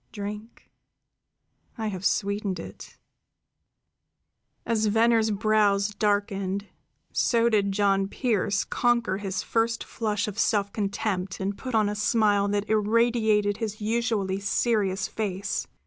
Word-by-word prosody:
"Drink. 210 +2 -8 1.1
I 220 -1 -2
have 190 -2 -6
sweetened 200 -2 -1
it." - - -10 1.7
As 220 -2 +1
Venner's 225 +1 +3
brows 205 -1 +2
darkened, 200 -2 -1 0.5
so 235 -1 +2
did 205 -3 +2
John 195 -1 +2
Pearse 205 -3 0
conquer 235 -5 +1
his 195 -2 -3
first 230 0 0
flush 210 -3 -2
of 210 +1 -5
self 205 -3 +1
contempt 195 -3 -2
and 195 +1 -2
put 255 +1 -5
on 215 -2 +3
a 205 - -1
smile 205 -1 +2
that 205 0 -1
irradiated 220 -1 +2
his 215 -2 -4
usually 215 -3 -1
serious 200 -1 0
face. 200 -2 -3
210 Hz, 115 wpm, -26 LUFS, 200-225 Hz, 1.7 s, Venner's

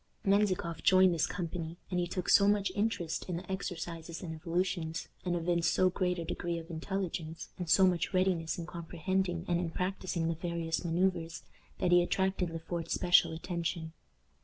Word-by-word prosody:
Menzikoff 190 -5 +2
joined 185 -1 +6
this 165 - +1
company, 170 -1 -4
and 180 - +1
he 175 - 0
took 180 0 -4
so 200 - +6
much 205 -1 +2
interest 200 -6 -1
in 175 - -1
the 180 - -7
exercises 170 -3 -5
and 165 -2 -4
evolutions, 170 0 -2 0.2
and 180 -1 0
evinced 170 0 +1
so 185 0 +3
great 180 -1 0
a 170 - -3
degree 170 +1 -2
of 165 +1 -8
intelligence, 165 -1 -4
and 175 -2 -4
so 175 +4 +6
much 180 0 +1
readiness 185 -3 +1
in 170 - -4
comprehending 175 +1 -2
and 175 -1 +1
in 175 -2 -1
practicing 180 -1 -2
the 165 - +1
various 170 0 -2
manoeuvres, 170 -1 0 0.3
that 180 - +1
he 175 0 +7
attracted 190 0 0
Le 165 - -4
Fort's 165 0 -3
special 175 -2 +5
attention. 165 -1 -3
175 Hz, 175 wpm, -32 LUFS, 165-185 Hz, 0.3 s, he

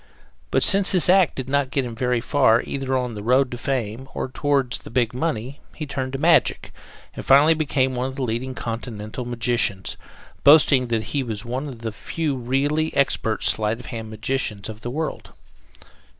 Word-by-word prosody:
But - - +2
since 195 -1 +4
this 180 -2 +2
act 185 -4 +4
did 130 -1 -5
not 140 -1 +1
get 135 -1 0
him 120 - -6
very 125 0 0
far 120 -4 +3
either 135 -1 -2
on 125 -2 -2
the 105 - -6
road 125 +4 +2
to 120 - -5
fame, 130 -1 -3
or - - -3
toward 140 -2 0
the - - -5
big 120 -2 0
money 130 -1 -3 0.2
he 155 - -5
turned 135 -2 -4
to 135 - -3
magic 165 +3 +2 0.4
and - - -7
finally 145 +4 +6
became 135 -4 0
one 125 +1 -1
of 130 - -7
the 135 - -3
leading 125 +2 -3
Continental 115 0 -5
magicians, 120 -5 -1 0.5
boasting 140 -3 +6
that 115 -2 -1
he 145 - +1
was 115 -3 -5
one 130 +5 -3
of 125 -5 -9
the 115 -1 -3
few 150 +6 -3
really 140 +5 0
expert 115 -6 +1
sleight 110 +1 +1
of 125 - -11
hand 110 -2 -6
magicians 110 -2 -3
of 110 0 -9
the 120 - -5
world. 155 +5 -4
130 Hz, 190 wpm, -23 LUFS, 115-140 Hz, 0.5 s, finally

